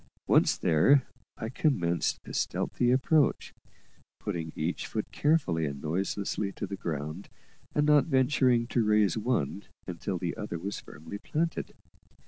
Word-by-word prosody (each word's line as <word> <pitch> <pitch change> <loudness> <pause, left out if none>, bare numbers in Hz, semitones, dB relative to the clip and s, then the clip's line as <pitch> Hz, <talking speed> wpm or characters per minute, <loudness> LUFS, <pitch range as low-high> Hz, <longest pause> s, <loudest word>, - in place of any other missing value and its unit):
Once - - +4
there, 130 - +4 0.3
I 110 - -4
commenced 90 - 0
a - - -8
stealthy 120 - 0
approach, 135 +3 +2 0.7
putting 80 -2 -4
each 80 +3 -2
foot 110 - -4
carefully 120 - +1
and 70 -1 -5
noiselessly 95 +5 -2
to - - -4
the 100 0 -5
ground, 75 0 -5 0.5
and 150 - +3
not 150 -1 +5
venturing 130 -4 +3
to 120 - +2
raise 105 -4 +3
one 105 - -1 0.2
until - - -4
the - - -3
other 85 - -4
was 100 +5 -4
firmly 80 +8 -9
planted. 165 +7 -2
105 Hz, 135 wpm, -29 LUFS, 85-130 Hz, 0.7 s, not